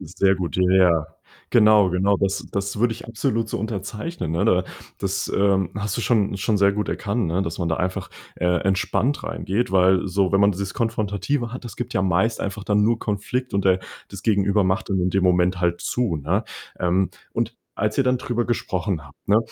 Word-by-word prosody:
Sehr 95 +2 +1
gut, 90 -1 -3
ja, 95 - +2
ja. 85 -5 +4 0.4
Genau, 105 -4 +5
genau. 95 +3 +2
Das 100 0 -1
das 100 +1 -2
würde 120 0 +2
ich 115 - -10
absolut 115 -1 -1
so - - -3
unterzeichnen, 110 - -4
ne? 85 - +1
Da 90 0 +3 0.3
das, 100 0 -2
ähm, 95 -2 +2
hast 105 +1 -2
du - - -2
schon 105 -5 +1
schon 105 +2 0
sehr 100 0 +4
gut 105 +1 -2
erkannt, 100 +1 -1
ne, 90 +4 0
dass 80 -2 -4
man 85 -2 -1
da 80 - +1
einfach, 90 0 -2 0.3
äh, 90 - -1 0.2
entspannt 100 +8 0
reingeht. 100 +1 -2
Weil 95 0 +4
so, 95 0 +1
wenn 100 - +4
man 100 0 +5
dieses 95 +1 -4
Konfrontative 115 +2 -1
hat, 125 - -7
das 120 - -7
gibt - - -5
ja 95 - +2
meist 95 +5 +1
einfach 100 +1 -4
dann 105 0 +2
nur 115 +1 +2
Konflikt 120 +5 -3
und 100 - +1
der 95 -1 +3 0.3
das 100 -2 -9
Gegenüber 100 -1 +2
macht 95 +3 -1
dann 95 -2 +1
in 90 +1 +1
dem 95 -1 +1
Moment 90 0 +2
halt 85 -1 0
zu, 120 -10 -1
ne? 90 +10 -1 0.3
Ähm, 90 +2 +1 0.2
und - - -2 0.2
als 105 +1 -1
ihr 135 - +4
dann 125 0 +1
drüber 120 -3 -1
gesprochen 95 -8 -2
habt, 70 +1 -21
ne, 105 +2 +6
100 Hz, 210 wpm, -23 LUFS, 95-110 Hz, 0.4 s, ne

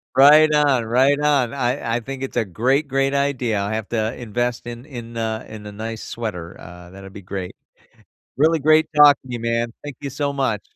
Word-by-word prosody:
Right 150 +3 +7
on, 140 -5 +3
right 130 +5 +3
on. 140 -5 +1
I 125 -3 -1
I - - 0
think 135 +2 -7
it's 135 - -5
a 120 - +2
great, 130 - 0
great 135 +1 +1
idea. 130 -6 0
I'll 100 +1 -2
have 110 -1 -3
to 110 0 -1
invest 120 +1 -3
in 120 +2 -8
in 120 -5 -9
a 110 -1 -3
in 110 -1 -10
a 105 - -7
nice 110 +2 -6
sweater, 90 -8 -6
uh, 90 +1 -12
that'd 95 +1 -12
be 100 - -10
great. 95 -1 -6 0.8
Really 160 +3 +3
great 155 +2 +4
talking 145 -3 +5
to - - -5
you 120 - -4
man, 115 0 -1
thank 145 -3 -8
you 140 -1 -5
so 140 +1 -2
much. 125 -7 -1
120 Hz, 205 wpm, -21 LUFS, 110-140 Hz, 0.8 s, Right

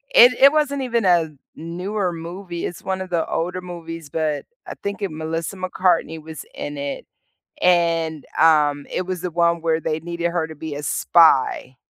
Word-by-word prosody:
It - - +9
it 275 +1 +7
wasn't 280 -3 0
even 235 -4 0
a 170 -3 +3 0.2
newer 180 +3 -3
movie, 170 +1 -6
it's 175 - -6
one 190 0 -2
of 185 - -6
the 170 -2 0
older 180 +2 -2
movies, 165 -3 -8
but 155 -1 -2 0.2
I - - -5
think 200 +1 -4
it 195 - -2
Melissa 160 +4 -4
McCartney 175 -3 0
was 160 -1 -9
in 145 0 -5
it, 140 0 -5 0.6
and, 165 -3 +2
um, 150 -3 +4
it 185 - -1
was 185 -2 -3
the 180 - -2
one 170 0 +2
where 160 -1 +1
they 155 0 -2
needed 170 +1 -2
her 170 -2 -1
to 160 - -10
be 155 -1 -6
a 145 - -6
spy. 140 -5 +3
170 Hz, 180 wpm, -22 LUFS, 160-185 Hz, 0.6 s, It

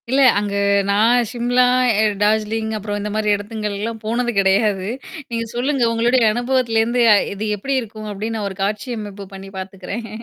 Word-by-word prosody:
இல்லை, 270 +2 +3
அங்க 205 0 -1 0.4
நான் 230 +4 +3
சிம்லா, 245 +1 +2 0.4
எ - - +4 0.2
டார்ஜிலிங் 220 +1 +1
அப்புறம் 205 0 -4
இந்த 210 +1 -4
மாதிரி 215 -1 0
இடத்துங்கள்லாம் 210 +1 -4
போனது 240 +2 0
கிடையாது. 195 0 +2 0.4
நீங்கச் 230 -1 -4
சொல்லுங்க. 260 +1 0
உங்களுடைய 235 +2 +2
அனுபவத்திலிருந்து 240 -1 +1 0.3
இது 210 +2 -4
எப்படி 270 +7 -2
இருக்கும் 215 -1 -8
அப்படின்னு 220 +3 -4
நான் 205 -2 -2
ஒரு 190 - -10
காட்சி 210 +4 -2
அமைப்பு 205 -1 -8
பண்ணி 195 0 -9
பாத்துக்கிறேன். 195 +4 -6
220 Hz, 155 wpm, -20 LUFS, 205-240 Hz, 0.4 s, எ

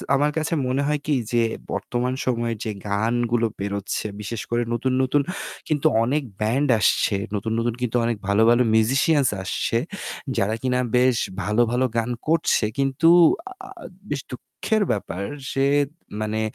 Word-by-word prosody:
আমার 145 +2 +2
কাছ - - -16
কাছে 160 - -2
মনে 130 +2 0
হয় 150 0 +1
কি 150 - +1 0.2
যে 120 -1 +4 0.3
বর্তমান 125 +1 -2
সময়ের 120 -2 -1
যে 110 - -1 0.2
গানগুলো 115 +3 +1
বেরোচ্ছে, 100 +1 -3
বিশেষ 105 +1 -4
করে 120 +1 +1
নতুন, 130 +2 0
নতুন 140 +3 +2 0.5
কিন্তু 155 0 +2 0.2
অনেক 140 +5 0 0.2
band 130 +7 +1
আসছে, 100 0 +2 0.2
নতুন, 110 +2 -2
নতুন 115 0 0
কিন্তু 125 -1 0
অনেক 115 -1 0
ভালো, 100 +2 +3
ভালো 120 +1 +5
musicians 135 +6 +3
আসছে। 105 +4 -1 0.6
যারা 105 +3 +1
কিনা 125 -1 +1 0.2
বেশ 125 -1 +4 0.3
ভালো, 105 +5 +1
ভালো 125 +2 +2
গান 115 +1 0 0.2
করছে। 160 -8 +2
কিন্তু 135 +4 +3 0.6
আ - - -13 0.4
বেশ 145 -2 -2
দুঃখের 125 - -2
ব্যাপার 100 -3 -3 0.3
যে 135 0 +2 0.6
মানে 110 0 -1
120 Hz, 150 wpm, -23 LUFS, 110-135 Hz, 0.6 s, ভালো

